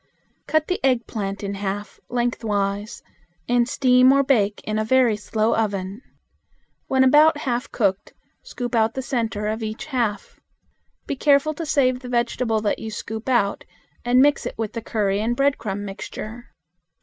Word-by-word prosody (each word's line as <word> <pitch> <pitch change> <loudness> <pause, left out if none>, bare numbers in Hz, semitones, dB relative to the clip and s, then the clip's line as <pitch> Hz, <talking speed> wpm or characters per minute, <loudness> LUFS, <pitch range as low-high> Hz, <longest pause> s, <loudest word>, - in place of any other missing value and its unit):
Cut 315 -1 +2
the 365 - -2
eggplant 220 -6 -1
in 200 0 -3
half 200 +1 -5
lengthwise, 210 -4 -2 0.4
and 240 0 +2
steam 255 0 +5
or 275 0 +4
bake 215 -7 +2
in 215 0 -2
a - - +1
very 245 -1 +3
slow 215 +2 0
oven. 200 -1 -2 0.9
When 265 0 +3
about 295 +4 +6
half 250 -2 -3
cooked, 200 -4 0 0.3
scoop 245 -1 -6
out 225 -1 +2
the 265 - -3
center 230 -5 -2
of 215 +1 -1
about - - -6
each 215 +1 -6
half. 240 -8 -2 0.7
Be - - -3
careful 285 +2 +3
to 320 +1 -6
save 255 -3 +2
the 250 -1 -9
vegetable 235 -2 0
that 210 - -1
you 220 - -5
scoop 220 +2 -6
out 235 -6 +1 0.4
and 250 +2 +4
mix 290 0 +2
it - - -7
with 220 -2 -3
the 230 - -4
curry 205 -3 0
and 235 +2 -1
breadcrumb 225 -8 0
mixture. 215 +4 -7
230 Hz, 160 wpm, -22 LUFS, 210-255 Hz, 0.9 s, about